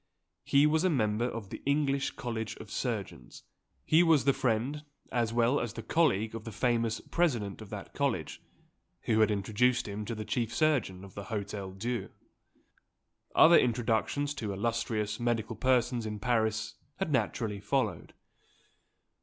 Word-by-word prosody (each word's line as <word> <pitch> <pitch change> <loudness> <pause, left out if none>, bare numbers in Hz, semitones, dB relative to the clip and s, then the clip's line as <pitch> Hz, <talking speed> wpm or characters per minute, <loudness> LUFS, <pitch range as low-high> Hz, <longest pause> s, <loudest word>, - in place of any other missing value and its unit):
He 140 +1 +4
was 155 +2 +3
a 185 - +4
member 110 -6 +1
of 110 -5 -7
the - - -7
English 140 -1 +1
College 115 -3 -4
of - - -11
Surgeons; - - -4 0.4
he 160 +2 +5
was 160 -7 +4
the 140 - +5
friend, 135 +3 -1 0.3
as 115 -2 0
well 120 +4 +2
as 120 -4 -3
the 115 - -7
colleague 115 -7 +2
of 115 -1 -6
the 115 - -7
famous 115 0 0
President 120 - -1
of 105 - -10
that 105 -2 -8
College, 135 - -2 0.6
who 110 -1 +1
had 110 - +5
introduced 110 +5 +1
him 105 +1 -4
to 115 +2 -4
the 110 0 -5
chief 115 0 -1
surgeon 130 - +1
of 100 - -12
the 100 - -7
Hotel 100 -1 -4
Dieu. 115 +2 -3 1.3
Other 170 +1 +8
introductions 120 +4 0
to 115 -8 -4
illustrious 110 +1 -1
medical 115 -1 -1
persons 125 -2 +1
in 105 0 -4
Paris 110 0 0 0.2
had 195 -5 -2
naturally 110 -4 -1
followed. 130 +7 -2
115 Hz, 155 wpm, -30 LUFS, 105-135 Hz, 1.3 s, Other